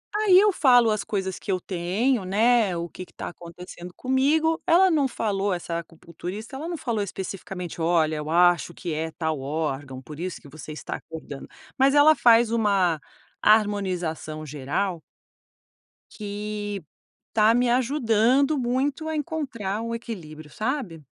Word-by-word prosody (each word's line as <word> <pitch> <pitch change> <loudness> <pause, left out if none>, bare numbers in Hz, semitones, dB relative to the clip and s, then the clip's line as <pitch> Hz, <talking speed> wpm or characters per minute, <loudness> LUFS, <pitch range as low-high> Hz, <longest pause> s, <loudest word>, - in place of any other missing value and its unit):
Aí 415 -3 +6
eu 415 +1 +5
falo 245 - +5
as 215 -1 0
coisas 190 -3 -3
que 200 - -4
eu 185 - +1
tenho, 190 +7 0
né, 215 0 +3
o 170 0 -3
que 185 - -9
que - - -25
tá - - -6
acontecendo 175 +1 -11
comigo, 295 - +1
ela 370 +3 +5
não 300 -5 +2
falou, 205 -5 -1
essa 170 -1 -3
acupunturista, 175 - -8
ela 300 +5 -5
não 345 -1 -3
falou 230 -7 -2
especificamente: 190 -2 -6
"Olha, 160 -2 +2
eu 150 0 -5
acho 175 0 +3
que 170 -3 -5
é 160 +1 -3
tal 160 -3 -2
órgão, 135 -2 -3
por 150 +3 -11
isso 180 +1 -5
que 145 - -14
você 155 +1 -10
está 150 - -6
acordando". 160 -4 -9 0.3
Mas 270 +1 +4
ela 295 +2 +7
faz 235 -3 +5
uma 195 -8 +2 0.4
harmonização 185 -7 +1
geral 150 +6 -2 1.1
que 205 -2 -5 0.5
tá 220 +1 +4
me 245 0 +2
ajudando 255 +2 +2
muito 265 +5 -1
a 315 - -2
encontrar 255 - -3
o 230 0 -3
equilíbrio, 155 -10 -8
sabe? 215 - -3
205 Hz, 150 wpm, -25 LUFS, 170-245 Hz, 1.1 s, ela